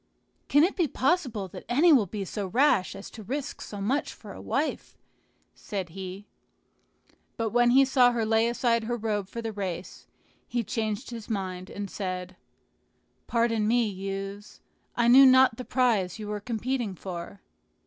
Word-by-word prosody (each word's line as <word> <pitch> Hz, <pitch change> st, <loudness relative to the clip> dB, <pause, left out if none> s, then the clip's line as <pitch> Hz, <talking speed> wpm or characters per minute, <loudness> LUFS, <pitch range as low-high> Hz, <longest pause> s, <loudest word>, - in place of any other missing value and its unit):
"Can 290 Hz, +1 st, +5 dB
it 365 Hz, -, +2 dB
be 345 Hz, -5 st, +1 dB
possible 260 Hz, -, 0 dB
that -, -, -9 dB
any 305 Hz, +7 st, +5 dB
will 230 Hz, -8 st, +4 dB
be 200 Hz, +1 st, -5 dB
so 200 Hz, +1 st, -4 dB
rash 235 Hz, -3 st, +2 dB
as 195 Hz, -, -9 dB
to 225 Hz, -, -10 dB
risk 275 Hz, +6 st, -5 dB
so 205 Hz, -, -7 dB
much 255 Hz, +9 st, -1 dB
for -, -, -11 dB
a -, -, -10 dB
wife?" -, -, -2 dB, 0.6 s
said 190 Hz, -4 st, -5 dB
he. 190 Hz, +3 st, -8 dB, 1.1 s
But 225 Hz, -2 st, -1 dB
when 240 Hz, 0 st, +4 dB
he 270 Hz, +3 st, +6 dB
saw 255 Hz, -2 st, +4 dB
her 235 Hz, -2 st, -1 dB
lay 225 Hz, +1 st, +3 dB
aside 235 Hz, -1 st, +1 dB
her 240 Hz, +1 st, -2 dB
robe 210 Hz, -3 st, -2 dB
for 230 Hz, +2 st, -6 dB
the 225 Hz, -1 st, -4 dB
race, 185 Hz, -3 st, -6 dB, 0.4 s
he 240 Hz, -1 st, -1 dB
changed 220 Hz, +1 st, -3 dB
his 230 Hz, -2 st, -8 dB
mind, 185 Hz, -3 st, -4 dB
and 205 Hz, 0 st, -5 dB
said, 185 Hz, -2 st, -5 dB, 0.9 s
"Pardon 230 Hz, -2 st, +1 dB
me, 235 Hz, 0 st, +3 dB
youths, 195 Hz, +1 st, -6 dB, 0.4 s
I 235 Hz, -1 st, +2 dB
knew 265 Hz, +3 st, +9 dB
not 260 Hz, -3 st, +6 dB
the 255 Hz, -, -5 dB
prize 225 Hz, -8 st, +1 dB
you 210 Hz, -1 st, -7 dB
were 210 Hz, 0 st, -3 dB
competing 235 Hz, -1 st, -3 dB
for." 180 Hz, +2 st, -7 dB
220 Hz, 170 wpm, -27 LUFS, 195-245 Hz, 1.1 s, knew